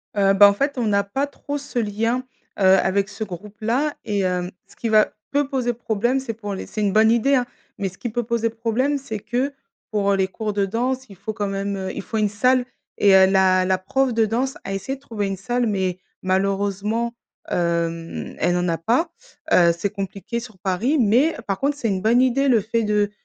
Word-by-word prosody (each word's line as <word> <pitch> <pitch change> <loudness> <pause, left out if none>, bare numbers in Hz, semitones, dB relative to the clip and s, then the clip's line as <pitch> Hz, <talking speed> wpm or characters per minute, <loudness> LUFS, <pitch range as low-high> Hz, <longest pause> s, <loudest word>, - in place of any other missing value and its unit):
Heu, 195 -1 +4
bah, 200 +1 +8
en - - +1
fait, 280 +6 -1
on 235 -3 0
n'a 200 -1 +2
pas 270 +8 -2
trop 285 0 -5
ce 280 -3 -4
lien, 225 +4 0 0.4
heu, - - +1
avec 195 +2 +1
ce 210 +1 -5
groupe-là 215 - -2
et 200 -2 0
heu, 180 -1 -1 0.2
ce - - -20
qui 230 - -3
va 215 -1 +5 0.2
peut 285 -1 +1
poser 250 -3 0
problème, 235 +3 0
c'est 260 -4 -4
pour 205 -2 -6
les 190 - -5
c'est 215 - -5
une 200 -1 +1
bonne 220 +1 +5
idée 270 +4 +3
hein, 250 - +2 0.3
mais 195 - -2
ce 185 - -17
qui 240 - -4
peut 240 +2 -2
poser 230 0 0
problème, 235 +5 0
c'est 225 -6 -6
que 255 +6 -2 0.4
pour, 200 -1 +1
heu, - - +3
les 190 -1 +1
cours 210 +2 -4
de 200 -1 +1
danse, 250 +6 -1
il 200 - -12
faut 205 +4 -5
quand 205 -1 -2
même, 195 0 -2
heu, 190 -1 -4
il - - -4
faut 220 +3 -4
une 210 -1 +2
salle 250 +5 +2 0.3
et 200 -1 +5
heu, 190 0 +8
la 190 -1 +4
la 185 0 +2
prof 255 +7 0
de 225 -1 +3
danse 250 +5 -1
a 195 - -4
essayé 265 +8 -3
de 270 - -18
trouver 215 -7 -3
une 195 - -2
salle 240 +4 -1
mais 185 -3 -1 0.2
malheureusement, 200 +4 0 0.4
hem, 170 -1 -2
elle 175 - +2
en 180 0 0
a 165 - 0
pas, 245 - +1 0.4
heu, 170 -1 +6
c'est 200 +4 -1
compliqué 200 +3 -4
sur 225 -4 -11
Paris. 200 - 0
Mais 245 +9 +3
par 195 -1 -2
contre, 285 +1 0
c'est 235 -5 -1
une 190 -2 -1
bonne 230 +4 +4
idée, 260 +2 +2
le 230 -5 +4
fait 230 +2 -1
de 210 -1 +1
215 Hz, 225 wpm, -22 LUFS, 195-245 Hz, 0.4 s, bah